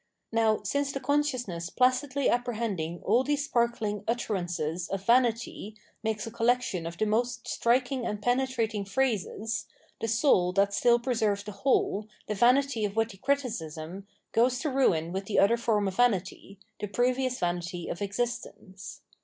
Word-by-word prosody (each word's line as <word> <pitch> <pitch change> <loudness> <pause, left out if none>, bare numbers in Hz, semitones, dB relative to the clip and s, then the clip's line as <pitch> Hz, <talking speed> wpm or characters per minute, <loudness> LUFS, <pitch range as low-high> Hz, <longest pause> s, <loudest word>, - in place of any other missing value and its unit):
Now, 225 -1 +2
since 280 +6 0
the 275 - -4
consciousness 255 - -1
placidly 255 +3 +1
apprehending 220 -9 -1
all 235 +6 +4
these 290 +1 0
sparkling 235 -5 0
utterances 180 -7 -2
of 195 0 -4
vanity 235 -3 +1 0.3
makes 220 -1 -2
a 225 - -6
collection 235 -7 0
of 170 +1 -7
the 215 - +1
most 235 +2 -1
striking 250 +2 +1
and 210 -3 -3
penetrating 245 -2 0
phrases, 220 0 -1 0.3
the 225 - -2
soul 220 -6 +3
that 200 +1 +2
still 240 +2 +4
preserves 225 -5 0
the 210 - -7
whole, 210 -1 +1 0.2
the 215 - -2
vanity 245 +2 +3
of 205 -1 -2
witty 225 -3 0
criticism, 195 - -3 0.2
goes 245 +2 +3
to 305 - -1
ruin 175 -11 +2
wdth 190 +1 -3
the 210 - -2
other 200 +4 +5
form 220 -4 +1
of 190 - -4
vanity, 200 -4 0 0.2
the 210 - -3
previous 250 +4 0
vanity 175 0 -2
of 170 - -5
existence. 200 -2 -4
225 Hz, 150 wpm, -28 LUFS, 195-250 Hz, 0.3 s, other